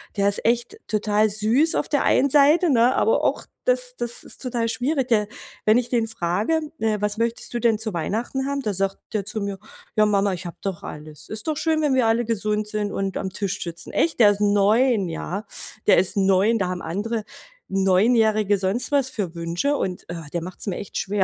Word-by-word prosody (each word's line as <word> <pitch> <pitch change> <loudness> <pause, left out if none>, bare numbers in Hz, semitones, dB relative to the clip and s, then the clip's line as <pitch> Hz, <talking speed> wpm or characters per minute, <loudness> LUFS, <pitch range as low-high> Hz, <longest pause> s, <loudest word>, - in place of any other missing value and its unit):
Der 200 0 +3
ist 200 - -3
echt 240 - +1
total 215 0 +2
süß 220 +10 +2
auf - - -1
der 285 - +1
einen 280 - +3
Seite, 300 +5 +5
ne, 250 -1 +4
aber 450 - +2
auch - - 0 0.2
das - - 0
das 240 0 -4
ist - - -11
total 240 -2 -1
schwierig. 265 +2 -1
Der 215 -4 +2 0.4
wenn 215 +3 +5
ich 245 - -4
den 235 -3 +1
frage, 215 - 0 0.2
äh: 220 -1 0
„Was 210 +1 0
möchtest 230 0 -2
du - - 0
denn 230 -2 +2
zu 220 -2 -3
Weihnachten 230 +10 -2
haben?" 280 0 -2
Da 210 -6 -2
sagt 195 +1 -1
der 205 -3 -1
zu 215 +1 -4
mir: 200 -1 -3 0.4
„Ja 215 - +5
Mama, 200 -1 +2
ich 180 +1 -6
hab 170 - -8
doch 195 -4 -4
alles. 150 0 -10
Ist 220 +4 -6
doch 310 -2 -1
schön, 315 0 +1
wenn 290 -3 +2
wir 255 -3 +3
alle 225 +1 +2
gesund 215 -1 -1
sind 210 -1 -2
und 195 -1 -2
am 190 -1 -3
Tisch 200 -1 -3
sitzen." 170 -1 -6
Echt, 325 -4 0
der 215 -3 +8
ist 205 - -3
9, 205 +1 +3
ja? 185 +5 -4 0.4
Der - - +6
ist 180 +1 +2
9 195 +3 +3
Da 185 - 0
haben 180 -1 -4
andere 210 +7 -3 0.5
Neunjährige 205 +2 +3
sonst 195 +8 0
was 275 -2 +2
für 200 -9 -4
Wünsche 170 +12 -1
und, 185 -6 -4
äh, 165 -3 -7
der 170 -1 -3
macht's 185 +4 -6
mir 190 - -2
echt 200 - -9
schwer. 200 0 0
215 Hz, 215 wpm, -23 LUFS, 195-240 Hz, 0.5 s, der